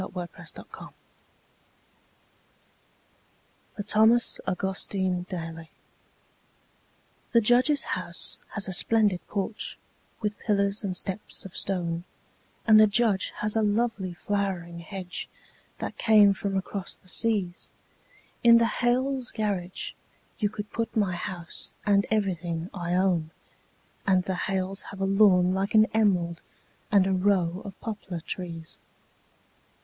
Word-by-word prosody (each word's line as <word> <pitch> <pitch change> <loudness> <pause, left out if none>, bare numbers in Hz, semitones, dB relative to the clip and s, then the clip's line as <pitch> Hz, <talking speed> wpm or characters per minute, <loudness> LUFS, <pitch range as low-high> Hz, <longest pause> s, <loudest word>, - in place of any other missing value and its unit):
The - - -4
Snowman 180 -2 -5
in - - -12
the - - -11
Yard - - -11 2.8
(For 205 - -4
Thomas 220 +4 +3
Augustine 190 -1 -1
Daly) 165 -2 -6 1.6
The 235 - +6
Judge's 250 +6 +4
house 175 -1 +1 0.2
has 210 -2 +1
a 190 - -3
splendid 205 0 +3
porch, 205 +1 -3 0.4
with 210 -1 -3
pillars 200 -1 +1
and 185 -3 -1
steps 195 +2 -2
of 190 - -10
stone, 170 -3 -1 0.6
And 215 -1 +7
the 215 - +7
Judge 210 -2 +2
has 210 +1 +2
a 220 - +3
lovely 210 -4 0
flowering 185 -3 -3
hedge 180 +1 -6 0.5
that - - -6
came 210 -3 +6
from 195 0 -3
across 190 0 -4
the - - -20
seas; 195 -3 +2 0.7
In 235 -1 +8
the 230 - +4 0.2
Hales' 255 +1 +1
garage 195 -5 -3 0.5
you 210 - +1
could 205 0 -7
put 230 0 -3
my 200 -4 +1
house 175 0 -4
and 200 -1 +3
everything 180 -5 -2
I 175 -2 -2
own, 180 -4 +1 0.8
And 185 -2 +3
the 190 - -2 0.2
Hales 190 0 0
have 195 - -10
a 195 - 0
lawn 195 -2 +4
like 195 +3 -1
an 215 0 +7
emerald 180 -6 +1 0.5
and 200 -3 +5
a 190 - +1
row 185 -2 +1
of 200 -2 -10
poplar 195 -6 -6
trees. 165 -2 -6
195 Hz, 130 wpm, -27 LUFS, 180-215 Hz, 2.8 s, In